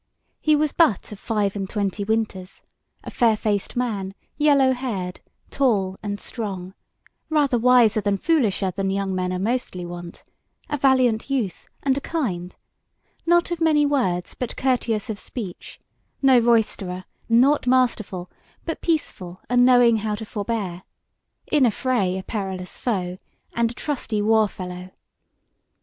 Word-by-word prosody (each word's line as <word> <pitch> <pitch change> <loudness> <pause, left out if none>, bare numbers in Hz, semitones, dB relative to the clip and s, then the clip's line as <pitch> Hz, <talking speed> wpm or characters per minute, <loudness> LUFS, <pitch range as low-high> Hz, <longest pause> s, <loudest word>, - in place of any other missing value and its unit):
He 305 -1 +3
was 300 0 +1
but 315 - +2
of 210 - -8
five 210 -3 -1
and 195 -2 -3
twenty 205 -1 -2
winters, 200 -3 -2 0.4
a - - -7
fair 225 -3 +3
faced 205 -2 -1
man, 205 -6 -2 0.2
yellow 285 -3 +4
haired, 210 -9 -4 0.3
tall 205 -9 +1
and 205 -1 -4
strong; 190 -6 -5 0.6
rather 285 -6 +2
wiser 235 -3 +5
than 200 -1 +1
foolisher 215 - +1
than 195 +1 -2
young 195 0 -1
men 180 0 -1
are 185 - -1
mostly 195 -3 -2
wont; 175 0 -9 0.5
a 295 - 0
valiant 255 -4 +3
youth, 240 -10 -2 0.2
and 275 0 +2
a - - -23
kind; 185 - -3 0.7
not 345 0 +3
of 340 -1 -3
many 305 -2 +4
words 210 -12 0
but 250 - -5
courteous 240 -5 0
of 205 - -6
speech; 200 -8 -7 0.4
no 265 -3 +6
roisterer, 215 -6 +1 0.3
nought 255 +4 +4
masterful, 230 -8 +1 0.4
but 325 - -4
peaceable 190 - -2
and 245 0 +5
knowing 245 -2 +6
how 215 0 -2
to 220 +1 -7
forbear: 205 -4 -3 0.7
in 295 -3 +4
a 245 - +6
fray 205 -5 0
a 190 - -5
perilous 190 -3 -4
foe, 185 -6 -2 0.3
and 235 -1 +1
a - - -7
trusty 250 -8 -2
war 220 +1 +4
fellow. 180 -2 -8
220 Hz, 145 wpm, -23 LUFS, 190-255 Hz, 0.7 s, no